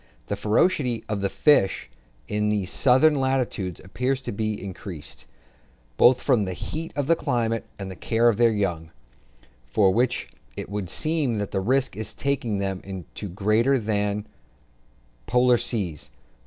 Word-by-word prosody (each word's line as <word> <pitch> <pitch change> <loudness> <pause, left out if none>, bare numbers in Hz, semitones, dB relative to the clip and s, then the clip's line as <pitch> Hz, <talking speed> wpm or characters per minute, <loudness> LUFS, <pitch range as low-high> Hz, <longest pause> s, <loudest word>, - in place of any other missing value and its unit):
The - - -2
ferocity 125 - +1
of 105 -2 -2
the 100 - 0
fish 120 -10 +3 0.4
in 105 0 0
these 100 -3 0
southern 135 +4 +5
latitudes 130 - -1
appears 125 +8 -2
to - - -4
be 110 0 -2
increased, 90 -6 -8 0.7
both 125 - +5
from 125 -7 +3
the 95 - -3
heat 160 - -5
of 145 -1 -1
the 165 +4 +4
climate 115 -5 -1
and 100 -2 -6
the - - -8
care 115 +7 +1
of 115 -4 +3
their 120 -1 +5
young, 90 -6 -2 0.8
for 95 - +3
which 125 +3 +1
reason - - -23 0.2
it - - -6
would 100 -3 -3
seem 155 - 0
that 105 -2 -3
the 95 - -1
risk 130 +2 +1
in 110 - -4
taking 130 -7 -1
them 95 -1 -2
is 95 -2 -7 0.3
greater 110 +7 +2
than 105 -2 0
in 105 +1 -4
the - - -27 1.0
polar 125 -1 +4
seas. 85 - -2
110 Hz, 165 wpm, -25 LUFS, 100-125 Hz, 1.0 s, southern